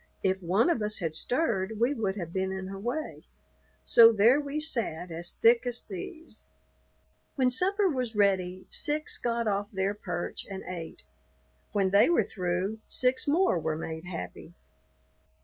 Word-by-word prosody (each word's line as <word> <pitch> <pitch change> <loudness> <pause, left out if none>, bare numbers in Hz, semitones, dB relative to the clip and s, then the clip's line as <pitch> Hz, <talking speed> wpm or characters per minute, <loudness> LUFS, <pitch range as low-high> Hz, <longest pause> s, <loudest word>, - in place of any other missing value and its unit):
If 190 0 +1
one 195 - +2
of 240 - -1
us 210 0 -1
had 165 -4 -3
stirred 220 - -1
we 240 +5 +2
would 210 -7 -2
have 170 -4 -6
been 190 0 -1
in 190 0 -5
her 195 0 -7
way; 250 +9 -4 0.6
so 230 -1 +8
there 230 +6 +5
we 285 +1 -3
sat 215 - -2
as 170 +1 -3
thick 235 +1 +4
as 245 -1 -2
thieves. 315 - -9 0.9
When 255 -2 +2
supper 390 +9 +2
was 255 -8 -2
ready 185 -3 +1
six 300 +1 -1
got 235 -1 -1
off 205 0 0
their 190 0 -1
perch 180 -4 -5
and 195 -1 -6
ate; 165 - -7 0.7
when 195 -2 +1
they 200 +8 +5
were 345 - +4
through, 185 +3 -2
six 255 +2 +1
more 315 - +3
were 155 0 -2
made 160 +1 -6
happy. 175 -1 -7
205 Hz, 160 wpm, -28 LUFS, 185-250 Hz, 0.9 s, so